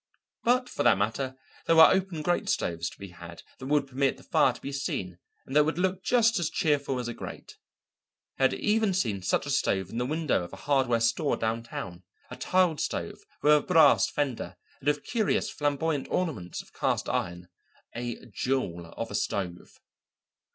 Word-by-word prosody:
But 250 +1 +3
for - - -4
that 120 -5 +5
matter 120 +6 -1 0.3
there 165 - +4
were 160 - +9
open 185 -5 0
grate 175 +5 0
stoves 85 - -1
to - - -15
be 100 -1 -9
had 85 -1 -11 0.2
that 130 - -7
would 145 0 +2
permit 135 0 0
the - - -16
fire 130 - +3
to 120 - -11
be 140 - -6
seen 95 -10 -3 0.3
and 135 - -7
that 150 - +7
would 160 +2 -1
look 185 +1 0
just 230 -3 +3
as 170 - 0
cheerful 145 -6 0
as 125 -1 -3
a 120 - -4
grate. - - -9 0.8
He - - +1
had 130 - +4
even 215 -2 +1
seen 105 - 0
such 90 - 0
a 145 - -3
stove 95 -8 0
in 115 - -3
the 125 - -1
window 155 - 0
of 85 - -10
a 95 - -10
hardware 130 -5 +2
store 120 +6 +1
downtown, 110 -5 -4 0.3
a - - -5
tiled 180 -4 +2
stove - - -3 0.2
with 150 - +6
a 150 - +5
brass 165 -1 +5
fender 140 -6 -3 0.2
and 140 - -9
with 145 0 +1
curious 220 -4 0
flamboyant 145 0 -1
ornaments 135 - -2
of - - -23
cast - - -1
iron 85 0 -3 0.5
a 120 -1 -5
jewel 95 -11 -2
of 115 -1 -4
a - - -6
stove. 95 -3 -3
135 Hz, 190 wpm, -28 LUFS, 110-160 Hz, 0.8 s, were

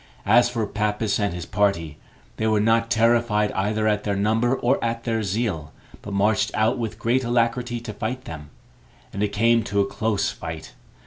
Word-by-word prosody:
As 120 0 +5
for 115 -3 -2
Pappus 105 +1 -1
and 100 -3 0
his 85 -1 -6
party, 90 -8 0 0.4
they 110 - 0
were 110 -1 +2
not 115 +2 +2
terrified 115 -2 +2
either 105 +3 0
at 105 -1 +1
their 100 -1 -1
number 110 +5 +1
or 130 +1 0
at 115 0 -2
their 115 -2 -1
zeal, 100 -7 -2 0.3
but 105 - -8
marched 105 +2 +2
out 110 +4 +1
with 110 -2 -4
great 120 +4 +1
alacrity 120 0 0
to 115 -2 -7
fight 120 +5 -4
them; 75 -2 -8 0.6
and 100 - -4
it 105 - +2
came 115 +3 +3
to 100 - -1
a 100 - +3
close 110 0 -1
fight. 80 0 -8
110 Hz, 185 wpm, -23 LUFS, 100-115 Hz, 0.6 s, As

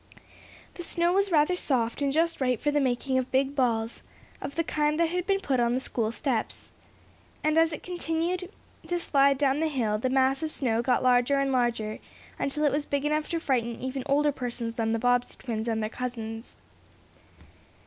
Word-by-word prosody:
The - - -8
snow 340 +1 +1
was 395 +1 +2
rather 310 +2 +4
soft, 250 -7 0
and 280 -1 +1
just 330 +1 +1
right 250 -3 +1
for 295 - 0
the 290 - +2
making 260 0 +1
of 255 - -3
big 270 +1 +1
balls, 230 -4 0 0.4
of 280 +1 -6
the 330 - +1
kind 300 0 0
that 335 -1 +3
had 360 +1 -2
been 390 -1 +2
put 270 -9 0
on 240 0 +2
the - - +1
school 230 -4 -1
steps. 235 -2 -2 0.7
And, 310 0 +2
as 325 0 +4
it 305 - -6
continued 355 +1 -2 0.4
to 350 - 0
slide 280 -4 +3
down 275 0 +2
the 320 - +1
hill, 230 -8 0
the 255 - 0
mass 265 +2 +2
of 315 - -1
snow 235 -6 +1
got 250 +1 +1
larger 250 +2 +4
and 275 0 +1
larger, 235 -4 0 0.4
until 300 +2 -1
it 295 - +4
was 290 +1 -1
big 285 0 -1
enough 305 +1 0
to 335 - -1
frighten 240 -6 -1
even 260 +1 -3
older 290 +1 +3
persons 240 -3 -4
than 225 -1 -1
the 230 - +1
Bobbsey 245 +1 +1
twins 225 -2 -4
and 220 -1 0
their 215 - -1
cousins. 230 -2 -6
270 Hz, 200 wpm, -27 LUFS, 240-305 Hz, 0.7 s, rather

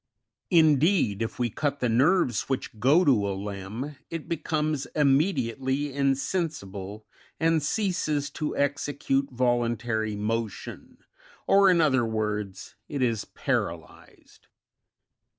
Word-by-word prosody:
22. 175 - +5
Indeed, 145 - +2
if 115 - -3
we 120 -2 -1
cut 145 +2 -2
the 125 - +1
nerves 130 - +2
which 130 -4 -3
go 145 +10 +4
to 110 -8 +3
a 95 - -3
limb, 105 +8 -6
it 165 -2 -6
becomes 155 -3 -1
immediately 140 -2 +1
insensible, 135 - -2 0.3
and 160 -1 +2
ceases 155 -5 -1
to 150 +1 -4
execute 140 -1 0
voluntary 120 -3 0
motion, 110 0 -4 0.5
or 195 0 +5
in 180 -2 +4
other 130 -5 +3
words, 105 -3 -3 0.2
it 140 -3 -1
is 115 -3 0
paralysed. - - -5
135 Hz, 115 wpm, -26 LUFS, 110-150 Hz, 0.5 s, 22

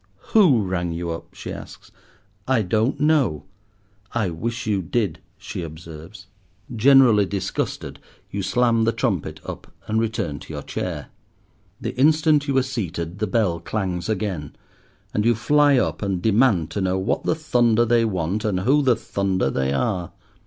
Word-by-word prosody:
"Who 160 - +5
rang 90 -2 -2
you 85 0 -3
up?" 80 - -8
she - - -6
asks. - - -11 0.6
"I 130 -4 +2
don't 110 +8 0
know." 145 - +2 0.7
"I 105 -6 0
wish 115 +8 -4
you 105 -3 0
did," 90 -2 -1 0.2
she 100 -1 -6
observes. 80 +4 -10 0.5
Generally 120 -4 +6
disgusted, 100 -1 -3 0.3
you 100 - -3
slam 115 +2 +2
the 115 - +2
trumpet - - -2
up - - -8
and 110 +1 0
return 110 -11 -2
to - - -11
your - - -5
chair. - - -4 0.7
The - - -4
instant 150 0 +4
you 135 -1 +1
are 130 - +4
seated 90 -8 -4
the 110 - 0
bell 95 -5 +1
clangs 90 -3 -3
again; 95 -8 -3 0.6
and 105 - +1
you 120 +1 +3
fly 145 +4 +4
up - - 0
and 100 -3 -1
demand 105 -4 +2
to 100 - -2
know 95 0 +1
what 95 - -1
the - - +1
thunder 120 -7 +2
they 115 0 +3
want, 95 -1 -1
and 100 -5 0
who 140 +9 +3
the 130 -4 +3
thunder 95 -10 -1
they 65 +1 0
are. 90 - -1
105 Hz, 160 wpm, -23 LUFS, 90-120 Hz, 0.7 s, Generally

